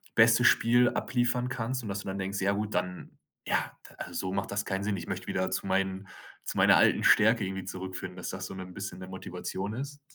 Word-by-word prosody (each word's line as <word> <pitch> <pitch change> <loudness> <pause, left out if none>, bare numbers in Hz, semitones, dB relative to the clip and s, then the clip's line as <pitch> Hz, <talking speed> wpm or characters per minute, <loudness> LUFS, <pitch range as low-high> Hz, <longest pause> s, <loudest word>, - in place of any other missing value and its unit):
bestes - - +6
Spiel 120 +1 +5
abliefern 125 0 0
kannst, 125 0 -3
und 105 - -5
dass 100 0 -2
du - - -10
dann 95 +1 -3
denkst: 95 +1 -2
„Ja 100 +1 +2
gut, 105 +1 -3
dann 90 0 -3 0.4
ja, - - 0 0.2
da - - -18
also - - -7
so 95 0 -2
macht 100 +2 -2
das 100 0 -1
keinen 95 0 -2
Sinn, 100 -1 -1
ich 85 - -7
möchte 95 0 -5
wieder 95 0 -1
zu 95 +1 -2
meinen 95 0 0 0.4
zu - - -4
meiner - - +6
alten - - +4
Stärke 110 0 +5
irgendwie 95 0 -4
zurückfinden“, 95 0 -6
dass 90 - -5
das 95 0 -5
so, - - -8
ne, 95 - -6
'n 90 -1 -11
bisschen 95 -2 -6
'ne 95 - -8
Motivation 95 +2 -5
ist? 140 +3 -6
95 Hz, 235 wpm, -29 LUFS, 95-110 Hz, 0.4 s, bestes